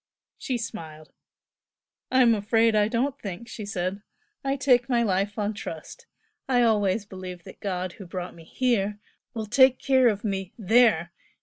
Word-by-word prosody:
She 255 Hz, -, -2 dB
smiled. 160 Hz, -9 st, -8 dB, 1.0 s
"I'm 255 Hz, -2 st, +5 dB
afraid 225 Hz, +2 st, +2 dB
I 210 Hz, -1 st, +4 dB
don't 255 Hz, +5 st, -1 dB
think!" 200 Hz, +3 st, -6 dB
she 215 Hz, -2 st, -7 dB
said 185 Hz, +1 st, -3 dB, 0.4 s
"I 275 Hz, 0 st, 0 dB
take 255 Hz, -3 st, +3 dB
my 240 Hz, -2 st, +2 dB
life 200 Hz, 0 st, 0 dB
on 210 Hz, 0 st, -1 dB
trust. 205 Hz, -, -8 dB, 0.4 s
I 245 Hz, -2 st, +4 dB
always 210 Hz, -2 st, +2 dB
believe 185 Hz, -3 st, -8 dB
that -, -, -13 dB
God 185 Hz, -3 st, -3 dB
who 195 Hz, -4 st, -11 dB
brought 180 Hz, 0 st, -6 dB
me 165 Hz, -, -14 dB
HERE 210 Hz, -3 st, 0 dB, 0.4 s
will 220 Hz, -1 st, -3 dB
take 260 Hz, +4 st, +5 dB
care 260 Hz, -2 st, +3 dB
of 205 Hz, -3 st, 0 dB
me 195 Hz, -3 st, -3 dB
THERE! 215 Hz, -6 st, +3 dB
210 Hz, 160 wpm, -26 LUFS, 185-240 Hz, 1.0 s, I'm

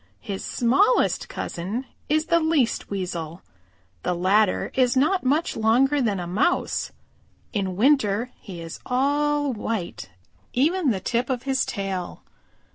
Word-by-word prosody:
His 200 Hz, -4 st, -5 dB
smallest 385 Hz, -, +2 dB
cousin 200 Hz, +10 st, -4 dB, 0.2 s
is 310 Hz, +1 st, +2 dB
the 335 Hz, +1 st, +3 dB
Least 315 Hz, -7 st, +1 dB
Weasel. 175 Hz, -4 st, -4 dB, 0.6 s
The 180 Hz, -, -1 dB
latter 190 Hz, +3 st, +2 dB
is 255 Hz, -1 st, +2 dB
not 315 Hz, +8 st, +2 dB
much 290 Hz, +6 st, +1 dB
longer 255 Hz, +6 st, +3 dB
than 210 Hz, -6 st, 0 dB
a 175 Hz, -, -4 dB
Mouse. 195 Hz, -, 0 dB, 0.6 s
In 190 Hz, -4 st, -1 dB
winter 240 Hz, -1 st, +2 dB
he 180 Hz, -5 st, -9 dB
is 165 Hz, -, -8 dB
all 290 Hz, +2 st, +1 dB
white, 215 Hz, -4 st, -4 dB, 0.4 s
even 310 Hz, +4 st, +2 dB
the 205 Hz, -5 st, 0 dB
tip 240 Hz, +5 st, -1 dB
of 255 Hz, -2 st, -1 dB
his 265 Hz, -1 st, +1 dB
tail. 190 Hz, -3 st, -4 dB
240 Hz, 130 wpm, -24 LUFS, 195-285 Hz, 0.6 s, the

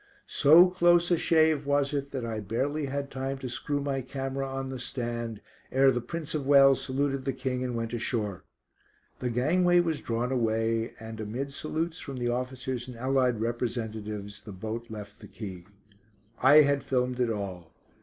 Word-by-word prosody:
So 165 Hz, +6 st, +7 dB
close 175 Hz, -1 st, +3 dB
a 175 Hz, -, +4 dB
shave 155 Hz, -3 st, +3 dB
was 145 Hz, 0 st, +1 dB
it 140 Hz, -1 st, -2 dB
that 130 Hz, -4 st, -4 dB
I 110 Hz, -2 st, -3 dB
barely 140 Hz, +9 st, -2 dB
had 140 Hz, +1 st, -4 dB
time 135 Hz, +1 st, -3 dB
to 135 Hz, -1 st, -6 dB
screw 145 Hz, +4 st, -2 dB
my 140 Hz, -1 st, -1 dB
camera 135 Hz, +1 st, -4 dB
on 135 Hz, 0 st, -3 dB
the 130 Hz, -1 st, -5 dB
stand 120 Hz, -3 st, -4 dB, 0.3 s
ere 135 Hz, +1 st, +5 dB
the 120 Hz, -1 st, -1 dB
Prince 155 Hz, +5 st, -5 dB
of 145 Hz, -3 st, -2 dB
Wales 135 Hz, -1 st, +6 dB
saluted 135 Hz, 0 st, -1 dB
the 135 Hz, -, -1 dB
King 130 Hz, 0 st, -2 dB
and 125 Hz, -1 st, -3 dB
went 115 Hz, 0 st, -3 dB
ashore. 110 Hz, -5 st, -2 dB, 0.8 s
The 125 Hz, -, -1 dB
gangway 175 Hz, +9 st, +3 dB
was 165 Hz, -3 st, 0 dB
drawn 120 Hz, +2 st, -2 dB
away 115 Hz, -2 st, 0 dB
and, 110 Hz, 0 st, -8 dB
amid 125 Hz, +6 st, -4 dB
salutes 160 Hz, +3 st, -3 dB
from 135 Hz, -3 st, -7 dB
the 120 Hz, -1 st, -1 dB
officers 125 Hz, 0 st, -3 dB
and 125 Hz, -2 st, -9 dB
allied 130 Hz, -2 st, +1 dB
representatives, 110 Hz, -3 st, -4 dB
the 105 Hz, -, -10 dB
boat 110 Hz, +5 st, -6 dB
left 105 Hz, -2 st, -9 dB
the -, -, -11 dB
quay. 95 Hz, -5 st, -8 dB, 0.7 s
I 145 Hz, +4 st, +8 dB
had 140 Hz, -1 st, +1 dB
filmed 125 Hz, -1 st, 0 dB
it 125 Hz, -2 st, +2 dB
all. 95 Hz, -6 st, -5 dB
130 Hz, 175 wpm, -28 LUFS, 115-140 Hz, 0.8 s, I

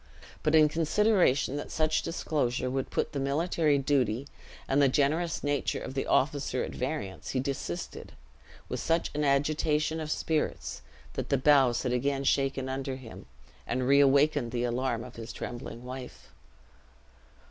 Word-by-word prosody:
But 155 Hz, +1 st, +2 dB
in 155 Hz, -1 st, +7 dB
consideration 165 Hz, -, +2 dB
that 145 Hz, -, -5 dB
such 155 Hz, -1 st, +1 dB
disclosure 135 Hz, -6 st, -1 dB
would 135 Hz, 0 st, -2 dB
put -, -, -1 dB
the 140 Hz, -, -3 dB
military 150 Hz, +2 st, +1 dB
duty 135 Hz, -3 st, +1 dB, 0.4 s
and 135 Hz, +2 st, +3 dB
the 140 Hz, -, +6 dB
generous 155 Hz, +5 st, +1 dB
nature 145 Hz, -1 st, 0 dB
of 130 Hz, -, -6 dB
the 135 Hz, -, -2 dB
officer 135 Hz, -2 st, +1 dB
at -, -, -5 dB
variance, 125 Hz, -8 st, -4 dB
he -, -, +2 dB
desisted, 130 Hz, -10 st, -5 dB, 0.5 s
with -, -, -4 dB
such 165 Hz, +1 st, 0 dB
an 150 Hz, 0 st, -1 dB
agitation 150 Hz, +2 st, +1 dB
of 155 Hz, -1 st, -4 dB
spirits 155 Hz, 0 st, -2 dB, 0.3 s
that -, -, -4 dB
the 140 Hz, -, +3 dB
boughs 130 Hz, -3 st, +4 dB
had 125 Hz, -2 st, 0 dB
again 135 Hz, +2 st, 0 dB
shaken 135 Hz, -1 st, +1 dB
under 135 Hz, 0 st, -3 dB
him, 125 Hz, -4 st, -11 dB, 0.4 s
and 125 Hz, +1 st, -1 dB
reawakened 140 Hz, -1 st, +4 dB
the 120 Hz, 0 st, -1 dB
alarm 120 Hz, -1 st, -1 dB
of 125 Hz, -1 st, -11 dB
his 115 Hz, 0 st, -7 dB
trembling 120 Hz, 0 st, -7 dB
wife. 125 Hz, -, -9 dB
140 Hz, 150 wpm, -29 LUFS, 130-150 Hz, 0.5 s, in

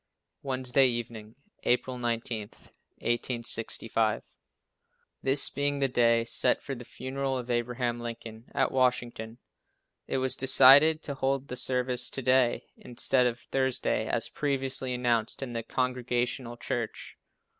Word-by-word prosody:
Wednesday 130 Hz, 0 st, +2 dB
evening, 115 Hz, -2 st, -4 dB, 0.3 s
April 125 Hz, +1 st, 0 dB
19, 115 Hz, -2 st, -2 dB, 0.6 s
1865. 115 Hz, -2 st, -1 dB, 1.0 s
This 135 Hz, +1 st, +3 dB
being 145 Hz, 0 st, 0 dB
the 140 Hz, -1 st, +2 dB
day 115 Hz, -2 st, +3 dB
set -, -, +2 dB
for 135 Hz, -, -4 dB
the 125 Hz, -2 st, -8 dB
funeral 130 Hz, +3 st, -4 dB
of 125 Hz, -1 st, -5 dB
Abraham 120 Hz, 0 st, -1 dB
Lincoln 115 Hz, -1 st, -8 dB
at 135 Hz, -, +1 dB
Washington, 120 Hz, -3 st, -1 dB, 0.7 s
it -, -, -1 dB
was 130 Hz, 0 st, +1 dB
decided 140 Hz, +4 st, +6 dB
to 145 Hz, -, -4 dB
hold 135 Hz, 0 st, -1 dB
the 125 Hz, -, -4 dB
service 125 Hz, -1 st, 0 dB
to 135 Hz, -, -5 dB
day, 130 Hz, -1 st, +2 dB
instead 125 Hz, +1 st, +1 dB
of 120 Hz, 0 st, -4 dB
Thursday, 130 Hz, -2 st, -1 dB
as -, -, 0 dB
previously 135 Hz, -2 st, -2 dB
announced 120 Hz, 0 st, 0 dB
in 125 Hz, -3 st, -6 dB
the 115 Hz, -, -2 dB
Congregational 125 Hz, 0 st, -2 dB
church. 120 Hz, -1 st, -5 dB
125 Hz, 125 wpm, -28 LUFS, 120-130 Hz, 1.0 s, decided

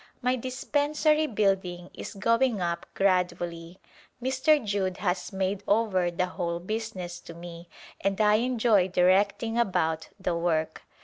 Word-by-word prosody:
My 250 Hz, +1 st, +2 dB
dispensary 295 Hz, +5 st, +1 dB
building 190 Hz, -6 st, -1 dB
is -, -, -8 dB
going 230 Hz, +3 st, +2 dB
up 170 Hz, -1 st, -2 dB
gradually. 175 Hz, -2 st, 0 dB, 0.4 s
Mr. 265 Hz, +2 st, +2 dB
Judd 195 Hz, -3 st, -1 dB
has 180 Hz, -2 st, -2 dB
made 190 Hz, 0 st, -1 dB
over 200 Hz, -4 st, +2 dB
the 175 Hz, +1 st, -1 dB
whole 170 Hz, -2 st, -3 dB
business 185 Hz, -3 st, -5 dB
to 170 Hz, -, -11 dB
me 170 Hz, 0 st, -10 dB, 0.3 s
and 195 Hz, +1 st, 0 dB
I 210 Hz, 0 st, +5 dB
enjoy 230 Hz, -5 st, +2 dB
directing 200 Hz, +5 st, +2 dB
about 160 Hz, -7 st, 0 dB
the 180 Hz, -2 st, -1 dB
work. 165 Hz, -2 st, -1 dB
190 Hz, 130 wpm, -27 LUFS, 175-230 Hz, 0.4 s, I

